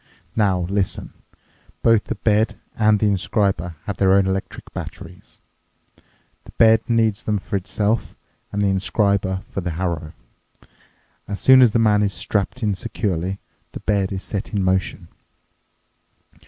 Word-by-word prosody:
"Now, 95 -5 +2
listen. 95 +2 -2 0.7
Both 115 -2 +4
the - - -3
bed 110 +1 +1 0.2
and 110 -1 +4
the 110 - +1
inscriber 95 -4 0
have 100 -3 -5
their 95 -1 +4
own 100 -1 +4
electric 95 0 -4
batteries. - - -9 1.1
The - - -14
bed 110 -1 +6
needs 110 -3 +1
them 105 -1 0
for 100 - -5
itself, 105 +3 -1 0.3
and 100 0 -1
the 100 - +3
inscriber 95 -1 0
for 95 - -4
the 90 - -3
harrow. 85 -4 -3 1.1
As 100 -1 -4
soon 130 0 +7
as 120 -3 +6
the 115 - +1
man 105 -2 +3
is 100 -1 0
strapped 110 +4 -2
in 105 -2 +1
securely, 95 0 -2 0.4
the - - -6
bed 100 -2 0
is 95 -1 -4
set 100 +1 -5
in 100 - +1
motion. 95 0 -1
100 Hz, 145 wpm, -21 LUFS, 95-105 Hz, 1.1 s, soon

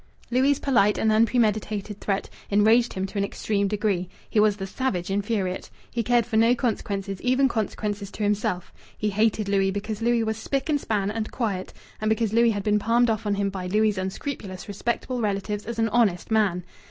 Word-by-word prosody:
Louis' 265 +3 +3
polite 210 -7 +3
and 220 - +2
unpremeditated 215 -2 +1
threat 195 -1 -1 0.2
enraged 220 +4 +4
him 190 0 -2
to 200 +1 -4
an - - +2
extreme 200 0 -1
degree. 195 -3 -1 0.2
He 215 - +1
was 210 -1 +4
the 195 - -4
savage 195 -4 -2
infuriate. 200 -2 -1 0.2
He 235 - -1
cared 240 0 +2
for 225 -2 -1
no 230 +2 +5
consequences, 200 -5 -2
even 255 +2 +3
consequences 210 -3 -3
to 215 - -4
himself. 205 -3 -1 0.2
He 210 -1 -1
hated 215 0 +1
Louis 195 -1 +2
because 205 +2 -4
Louis 235 0 +2
was 220 -1 -2
spick 275 +6 -2
and 290 -2 +2
span, 205 -2 -1
and 220 0 -3
quiet, 205 -7 -3 0.3
and 215 - +1
because 220 -1 +1
Louis 235 +1 +5
had 205 -3 -1
been 210 0 +2
palmed 230 +2 +3
off 215 -1 -2
on 205 - +1
him 200 0 0
by 185 -2 -5
Louis' 210 +1 +2
unscrupulous 190 0 -5
respectable 235 +4 -2
relatives 205 0 -2
as 235 -1 -4
an 225 0 +2
honest 210 -4 +1
man. 200 -5 +2
210 Hz, 190 wpm, -25 LUFS, 200-230 Hz, 0.3 s, no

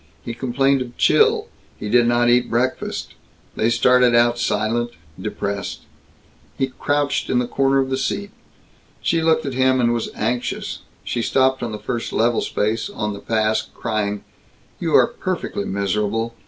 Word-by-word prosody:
He 120 - -5
complained 135 +2 +1
of 120 -1 -7
chill. - - +4 0.3
He 105 - -6
did 120 +2 +4
not 120 0 +3
eat 120 +1 +3
breakfast. 125 +3 -2 0.4
They 110 - +2
started 125 +1 +4
out 120 0 +4
silent, 115 +2 0 0.3
depressed. 100 -1 -4 0.8
He 135 -1 -1
crouched 145 0 0
in - - +2
the 125 - +2
corner 135 +2 +1
of 135 -1 +1
the 130 - +1
seat. 200 +9 -2 0.7
She 165 - +2
looked 160 -1 +2
at 135 - -3
him 130 0 +3
and 120 -1 +3
was 115 -1 -2
anxious. 120 +3 -2 0.2
She 120 - -2
stopped 130 +3 +2
on 120 -2 -3
the 105 - -4
first 115 +3 -4
level 120 +1 +2
space 110 +2 -1
on 105 -2 -3
the 100 - -7
pass, 110 0 +1
crying, 105 -3 -2 0.6
"You - - +1
are - - +7
perfectly - - -4
miserable. 105 +4 -1
120 Hz, 160 wpm, -21 LUFS, 110-130 Hz, 0.8 s, are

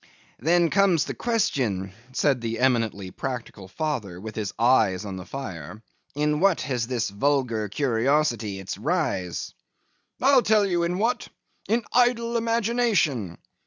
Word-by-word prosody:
'Then 170 +4 +3
comes 190 -5 +3
the - - -4
question; 125 - -1 0.2
said 135 -1 +1
the 115 -1 -3
eminently 115 -7 0
practical 120 -7 -6
father, 105 - -3
with 110 +3 -7
his 105 -3 -3
eyes 110 -5 +3
on 100 -2 -5
the 90 -1 -7
fire, 105 - -7 0.4
'in 150 0 +1
what 195 -1 +3
has 120 -3 -2
this 120 -5 -1
vulgar 115 -2 0
curiosity 120 -3 +1
its 95 0 -6
rise?' 125 - -2 0.7
'I'll 270 0 +5
tell 215 -3 +3
you 175 -3 0
in 170 +1 0
what. 230 +5 0 0.4
In 230 +2 +2
idle 240 -1 +2
imagination. 225 - +1
130 Hz, 135 wpm, -25 LUFS, -, 0.7 s, I'll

